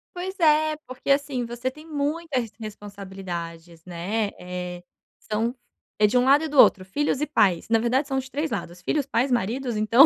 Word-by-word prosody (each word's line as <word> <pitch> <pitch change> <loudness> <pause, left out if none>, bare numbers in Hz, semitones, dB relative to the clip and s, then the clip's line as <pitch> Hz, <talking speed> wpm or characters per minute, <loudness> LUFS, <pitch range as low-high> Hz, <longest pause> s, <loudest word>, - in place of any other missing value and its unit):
Pois 375 +2 -5
é, 310 -1 +4
porque, 255 +2 -2
assim, 275 -3 +1
você 240 +2 -3
tem 305 +4 -13
muitas 295 -2 -1
res 225 - -7
responsabilidades, 190 -6 -7
né, 195 +5 -2
eh, 180 0 -6 0.4
são 225 +4 -1 0.4
é 210 - +6
de 215 +4 +1
um 250 - +4
lado 280 +4 +6
e - - -1
do 290 -3 +1
outro. 185 -1 +7
Filhos 285 +7 0
e - - +2
pais, 190 - +2
na 225 -1 +4
verdade 255 +5 +1
são 270 -1 0
de 265 0 -7
3 300 +2 -1
lados, 175 +1 -4
filhos 290 +5 0
pais, 255 +2 +1
maridos, 240 +2 0
então. 230 +7 +7
240 Hz, 190 wpm, -25 LUFS, 195-285 Hz, 0.4 s, outro